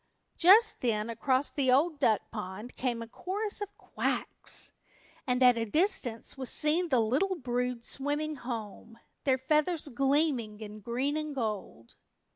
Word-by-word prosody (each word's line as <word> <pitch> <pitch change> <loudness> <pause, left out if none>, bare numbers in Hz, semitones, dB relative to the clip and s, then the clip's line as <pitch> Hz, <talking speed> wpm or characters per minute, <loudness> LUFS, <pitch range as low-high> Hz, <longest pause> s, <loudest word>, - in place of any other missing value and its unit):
Just 420 +6 +6
then 225 -2 0
across 260 +4 +1
the 265 -3 +1
Old 295 +4 +3
Duck 220 -2 +3
Pond 210 +2 -6
came 240 -3 -2
a - - -10
chorus 405 - -3
of 410 0 -6
quacks, - - -2 0.6
and 250 0 +2
at 245 -2 +6
a - - +1
distance 275 - 0
was 260 -2 -5
seen 330 +4 0
the 255 -4 +4
little 275 - +1
brood 250 -4 -2
swimming 295 +2 -1
home, 230 -2 -6 0.3
their 265 -2 +3
feathers 300 +4 +1
gleaming 270 -5 +1
in 215 -1 -8
green 250 +7 -1
and 305 -2 -4
gold. 210 - -4
260 Hz, 145 wpm, -30 LUFS, 230-305 Hz, 0.6 s, Just